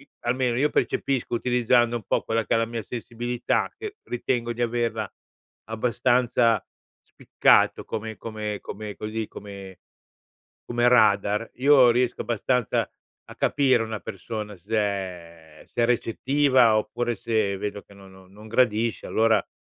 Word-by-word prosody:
i 140 - -20
almeno, 120 0 0
io 150 +2 +2
percepisco, 130 -3 -1
utilizzando 120 -1 +2
un 110 - -7
po' - - 0
quella 115 0 -1
che - - +1
è - - +3
la 115 - +2
mia 115 -1 -5
sensibilità, 120 +1 -2
che 430 -1 -7
ritengo 120 -1 -2
di 120 - -3
averla 115 -3 -1 0.6
abbastanza 120 0 +1 0.4
spiccato - - +2
come 110 0 -5
come 105 -2 -5
come 105 -1 -7
così 110 0 -4
come 100 -2 -10 0.9
come 120 0 +2
radar. 105 -2 +3
Io 130 -2 +6
riesco 125 +1 0
abbastanza 120 +1 0 0.4
a - - -12
capire 130 -5 +2
una 110 -2 -5
persona 105 +1 -6
se 105 +6 -4
è 90 -6 -4
se 120 - -2
è - - +4
recettiva 125 0 +3
oppure 120 +2 -2
se 110 -4 0
vedo 105 0 -4
che - - -20
no 100 -1 -15 0.2
non 105 +3 -14
gradisce, 115 -1 +1
allora, 110 0 +2
115 Hz, 140 wpm, -25 LUFS, 105-120 Hz, 0.9 s, Io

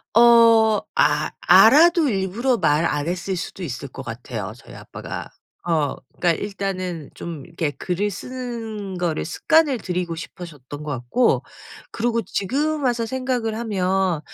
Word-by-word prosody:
어 230 -2 +6 0.2
아 - - +2
알아도 335 +1 +6
일부러 220 +5 0
말 150 -4 +2
안 145 -2 -1
했을 180 +2 -2
수도 180 +2 -6
있을 135 -8 -5
것 - - -9
같아요 - - -6
저희 - - -14
아빠가. - - -8 0.4
어 155 -5 +1 0.2
그러니까 175 - +3
일단은 185 -5 -4
좀 165 -5 -7
이렇게 165 -3 -3
글을 190 +7 -2
쓰는 225 -4 -6
거를 170 -3 -1
습관을 290 - +2
들이고 180 -4 -3
싶으셨던 150 -5 -9
거 150 - -4
같고 130 - +1 0.5
그리고 230 0 0
지금 285 - -1
와서 240 -3 +1
생각을 250 -3 -2
하면 190 -6 0
195 Hz, 285 characters per minute, -22 LUFS, 170-235 Hz, 0.5 s, 어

